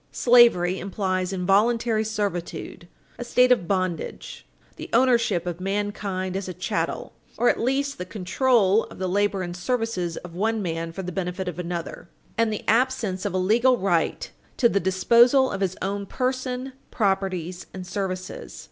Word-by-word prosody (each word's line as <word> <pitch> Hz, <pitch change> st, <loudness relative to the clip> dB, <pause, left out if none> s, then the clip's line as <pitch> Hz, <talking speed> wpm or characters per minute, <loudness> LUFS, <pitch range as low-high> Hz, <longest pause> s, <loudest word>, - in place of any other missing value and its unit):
Slavery 230 Hz, -7 st, +5 dB
implies 185 Hz, -1 st, -2 dB
involuntary 215 Hz, +4 st, +2 dB
servitude 200 Hz, -5 st, -4 dB, 0.3 s
a -, -, -3 dB
state 250 Hz, +1 st, +3 dB
of 210 Hz, -9 st, +3 dB
bondage; 185 Hz, -3 st, -3 dB, 0.3 s
the -, -, -8 dB
ownership 230 Hz, -7 st, +3 dB
of 175 Hz, 0 st, -4 dB
mankind 195 Hz, -1 st, -2 dB
as 195 Hz, 0 st, -3 dB
a 185 Hz, -, -6 dB
chattel, 180 Hz, -, -3 dB, 0.2 s
or 245 Hz, -, +3 dB
at -, -, +1 dB
least 275 Hz, +3 st, -1 dB
the -, -, -2 dB
control 215 Hz, +2 st, +2 dB
of -, -, -13 dB
the 185 Hz, -, -2 dB
labor 200 Hz, 0 st, +1 dB
and 175 Hz, 0 st, -5 dB
services 185 Hz, -4 st, -2 dB
of 175 Hz, -1 st, -9 dB
one 220 Hz, +5 st, 0 dB
man 165 Hz, -3 st, -3 dB
for 190 Hz, +3 st, -6 dB
the 180 Hz, -, -4 dB
benefit 180 Hz, +1 st, -3 dB
of 180 Hz, -1 st, -5 dB
another, 170 Hz, -1 st, -5 dB, 0.3 s
and 230 Hz, -1 st, +1 dB
the 215 Hz, -, -5 dB
absence 225 Hz, -6 st, +1 dB
of 200 Hz, -, -1 dB
a -, -, +2 dB
legal 235 Hz, +7 st, +3 dB
right 175 Hz, -5 st, 0 dB, 0.3 s
to 240 Hz, -, +5 dB
the 200 Hz, -, +1 dB
disposal 235 Hz, +8 st, +4 dB
of -, -, -4 dB
his 190 Hz, -1 st, -1 dB
own 200 Hz, +1 st, -3 dB
person, 255 Hz, +1 st, -2 dB, 0.2 s
property 190 Hz, -4 st, -1 dB, 0.2 s
and 185 Hz, -1 st, -7 dB
services. 185 Hz, -1 st, -5 dB
195 Hz, 160 wpm, -24 LUFS, 180-235 Hz, 0.3 s, Slavery